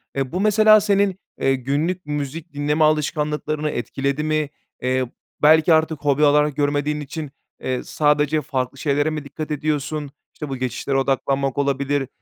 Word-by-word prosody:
Eee, 135 -2 -2
bu, 180 - -1
mesela, 215 0 +6
senin, 200 -2 +1 0.2
eee, 135 0 +3
günlük 150 +7 -2
müzik 150 +3 -5
dinleme 150 +2 +1
alışkanlıklarını 150 0 0
etkiledi 140 +4 -2
mi? 155 -1 0 0.3
Eee, 130 0 +1 0.4
belki 160 +2 +6
artık 160 -1 +2
hobi 145 +1 +3
alarak 150 0 +3
görmediğin 145 +1 0
için, 145 0 -6 0.3
eee, 130 -1 -2
sadece 150 0 +1
farklı 135 -2 -3
şeylere 145 +1 +1
mi 155 -2 -4
dikkat 150 +2 -7
ediyorsun, 150 -1 -2 0.2
işte, 150 -2 -7
bu 135 - -3
geçişlere 130 +2 -2
odaklanmak 135 0 0
olabilir, 140 0 0
150 Hz, 145 wpm, -21 LUFS, 140-155 Hz, 0.4 s, mesela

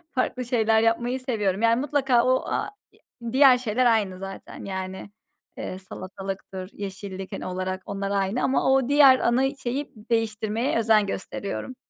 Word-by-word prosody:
Farklı 255 0 -1
şeyler, 225 -2 +2
yapmayı 240 +3 +1
seviyorum. 210 -7 -1
Yani 230 +2 +3
mutlaka 270 -5 +2
o 255 0 +2
a - - -2 0.2
ya 235 -2 -11
diğer 265 -1 +7
şeyler 250 0 0
aynı 210 -6 +2
zaten. 195 0 -8
Yani, 190 0 -5 0.5
eee, 185 - -5
salatalıktır, 190 0 -7
yeşillik 195 -1 -7
hani, - - -5
olarak. 185 +1 -3
Onlar 200 0 -3
aynı 200 +4 0
ama 265 0 +2
o 265 -1 +2
diğer 280 -3 +7
ana 265 +4 +1
şeyi, 270 +2 -4 0.2
değiştirmeye 225 +1 0
özen 220 -2 +4
gösteriyorum. 200 +5 -5
225 Hz, 145 wpm, -25 LUFS, 195-255 Hz, 0.5 s, diğer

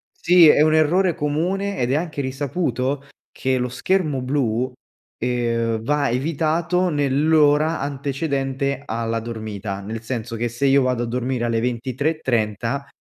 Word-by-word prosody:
Sì, 175 -1 +6
è 150 - +6
un 155 0 +4
errore 170 +3 +3
comune 185 +7 -1
ed 125 +1 0
è - - +2
anche 155 -3 -2
risaputo 135 0 -2 0.2
che 130 0 -1
lo 125 0 -1
schermo 145 +2 0
blu, 125 -2 0 0.5
ehm, 115 -2 -1
va 145 0 +1
evitato 165 +6 0
nell’ora 150 +1 +3
antecedente 140 -1 -2
alla 115 -1 -2
dormita, 110 -3 -5
nel 110 +3 -6
senso 115 -1 -4
che 120 +1 -1
se 120 +4 -2
io 135 0 +5
vado 125 -2 0
a - - -1
dormire 125 0 -2
alle 115 -1 0
23.30 125 -1 -1
135 Hz, 140 wpm, -22 LUFS, 120-150 Hz, 0.5 s, Sì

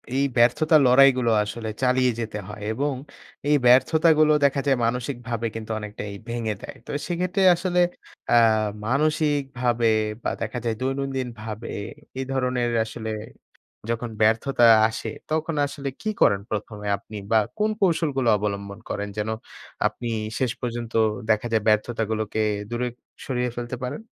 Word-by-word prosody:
এই 135 - +2
ব্যর্থতার 150 +6 +5
লড়াইগুলো 125 -2 +5
আসলে 110 +1 -5
চালিয়ে 125 0 +3
যেতে 110 -2 -4
হয় 105 0 -9
এবং 140 +5 -1 0.6
এই 150 - +5
ব্যর্থতাগুলো 155 +5 +5
দেখা 140 0 +2
যায় 135 -2 +3
মানসিকভাবে 120 -1 -2
কিন্তু 110 0 -6
অনেকটাই 105 -1 -6 0.2
ভেঙে 115 -2 -2
দেয়। - - -9
তো - - -7 0.2
সেক্ষেত্রে 180 +2 0
আসলে 180 0 0 0.5
আ - - +6 0.5
মানসিকভাবে 135 -4 +1 0.4
বা - - 0
দেখা 115 +2 -3
যায় 115 -1 0
দৈনন্দিন 135 0 -2
ভাবে 110 +1 -6 0.5
এই 135 - -2
ধরনের 125 -2 0
আসলে 110 0 -6 0.8
যখন 115 0 -2
ব্যর্থতা 115 +3 +3 0.2
আসে, 110 - -6 0.2
তখন 160 0 -1
আসলে 140 0 -6
কি 215 - -2
করেন 100 -1 +4
১ 105 0 -4
এ - - -1
আপনি 110 - -13 0.2
বা 110 - +5 0.2
কোন 215 +1 +2
কৌশলগুলো 155 -9 +2
অবলম্বন 100 0 -4
করেন? 105 0 -3
যেন 105 +1 -1 0.6
আপনি 120 - -6 0.3
শেষ 130 -3 +1
পর্যন্ত 120 -1 -4 0.4
দেখা 110 +2 +2
যায় 110 -2 +2
ব্যর্থতাগুলোকে 110 0 0 0.3
দূরে 120 +1 -1 0.4
সরিয়ে 125 -2 -1
ফেলতে 120 +1 -4
পারেন? 130 +9 -4
125 Hz, 140 wpm, -24 LUFS, 110-140 Hz, 0.8 s, আ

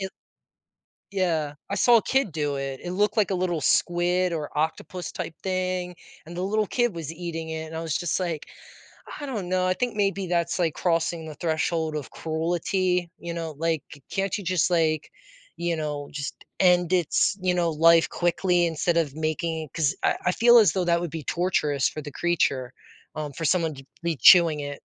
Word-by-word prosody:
i 190 - -3 1.0
Yeah, 165 -7 0
I 200 - -1
saw 235 +4 +6
a - - +2
kid 265 -7 +1
do 145 -2 -1
it. 135 -1 -4
It 175 - -5
looked 205 +4 +1
like 205 -2 +2
a - - +1
little 180 -3 -1
squid 175 +3 +2
or 150 -3 -4
octopus 160 +3 -2
type 165 - -6
thing 185 -1 -2 0.3
and 170 +2 -9
the - - -2
little 210 +3 +1
kid 240 -2 0
was 160 -2 -5
eating 165 -1 -5
it 160 0 -4
and 160 - -9
I 160 - -3
was 160 -1 -1
just 175 -3 -1
like, 170 -5 -3 0.7
I 290 - -5
don't 215 -9 -4
know, 185 0 +1
I 185 - +2
think 245 +1 -2
maybe 195 -2 0
that's 170 0 0
like 165 -3 +1
crossing 165 -1 0
the 155 - -7
threshold 160 -1 -1
of 145 - -6
cruelty, 175 +2 -1
you 170 0 -6
know, 165 -3 -5
like, 165 -2 0 0.3
can't 195 +1 -1
you 200 - -7
just 180 0 +1
like, 160 -3 +1 0.5
you 170 0 -1
know, 150 -2 -4
just 145 -3 -6 0.2
end 180 -1 +4
its, 180 +2 +2
you 180 -1 +2
know, 175 -2 +1
life 165 +1 +5
quickly 175 0 +1
instead 170 +1 0
of 150 -4 0
making 160 +1 -2
it 150 - -15
'cause 150 -4 +1
I - - +3
I 180 - +4
feel 240 +4 +6
as 205 -8 +5
though 185 -2 0
that 170 0 +2
would 175 -2 -4
be 160 -1 -6
torturous 150 -6 +1
for 155 - -6
the 145 -1 -8
creature, 140 -7 0 0.4
um, 150 -2 -4
for 165 - -6
someone 165 0 +1
to 135 -1 -12 0.2
be 170 -2 -1
chewing 165 0 +7
it. 145 0 -4
170 Hz, 200 wpm, -25 LUFS, 155-185 Hz, 1.0 s, chewing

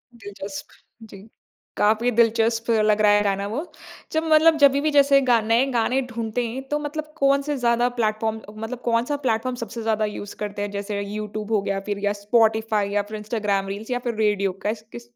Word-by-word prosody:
दिलचस्प, 200 -2 -8 0.4
जी। 205 -1 -13 0.5
काफ़ी 220 +4 +2
दिलचस्प 230 0 +2
लग 215 -1 +3
रहा 210 -1 +5
है 205 0 +4
गाना 200 0 0
वो। 245 +10 -3 0.5
जब 315 0 0
मतलब 315 +1 +6
जभी 280 0 +6
भी 310 - +1
जैसे 280 -1 +5
गा 235 -1 +5
नए 230 +4 +2
गाने 245 +3 +1
ढूँढते 230 +1 -2
हैं, 250 +4 -5
तो 295 0 0
मतलब 305 +1 -5
कौन-से 280 +1 +2
ज़्यादा 240 0 +2
प्लेटफॉर्म 220 0 -1 0.2
मतलब 235 +3 -6
कौन-सा 235 +5 +1
प्लेटफॉर्म 245 +2 0
सबसे 230 +1 -7
ज़्यादा 220 -1 0
यूज़ 205 -1 -6
करते 205 -1 -4
हैं, 205 0 -3
जैसे 200 0 -4
यूट्यूब 210 +1 -5
हो 210 -2 +2
गया, 195 0 -2
फिर 200 0 -2
या 205 - +1
स्पॉटिफाई, 220 -1 +2
या 205 0 +1
फिर 215 - -5
इंस्टाग्राम 210 -2 -1
रील्स, 205 +5 -6
या 245 - 0
फिर 235 - -1
रेडियो? 205 -3 +1
क 190 - -23
कैस, 215 +1 -2
किस 235 0 -10
220 Hz, 195 wpm, -23 LUFS, 205-245 Hz, 0.5 s, मतलब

